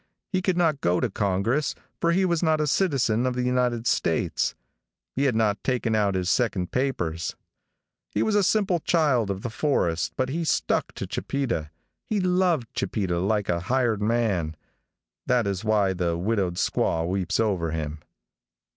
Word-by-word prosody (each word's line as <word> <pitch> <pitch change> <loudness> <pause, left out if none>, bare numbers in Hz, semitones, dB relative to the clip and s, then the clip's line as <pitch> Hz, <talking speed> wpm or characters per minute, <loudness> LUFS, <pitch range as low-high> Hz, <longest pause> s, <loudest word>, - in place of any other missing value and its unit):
He 185 -2 +1
could 185 -1 0
not 160 -5 +2
go 90 +1 +2
to 125 - -1
Congress, 105 +9 0 0.2
for 170 - +2
he 190 +2 +3
was 170 -3 +1
not 160 -2 +2
a 150 - +2
citizen 130 - +1
of 125 - -1
the 125 - -1
United 125 -2 0
States. - - 0 0.6
He 140 - +1
had 130 -5 +2
not 110 -2 +1
taken 125 -3 0
out 105 -3 +2
his 90 -1 -1
second 95 -5 0
papers. 85 - -1 0.7
He - - 0
was 220 - +1
a 205 - +4
simple 195 -2 +2
child 145 - +2
of 95 0 -3
the 120 - -3
forest, 85 - 0
but 130 0 0
he 165 +5 -2
stuck 160 - 0
to - - -5
Chipeta. 120 - -2 0.3
He 215 - -1
loved 180 - +1
Chipeta 90 -5 -1
like 100 +2 0
a 85 - +1
hired 115 +2 0
man. 105 -8 0 0.7
That 125 -3 +2
is 100 0 -2
why 105 -3 +2
the 85 -2 -1
widowed 95 -1 0
squaw 80 -1 0
weeps 95 +1 -1
over 95 -7 +1
him. 80 -1 -4
115 Hz, 170 wpm, -25 LUFS, 95-140 Hz, 0.7 s, a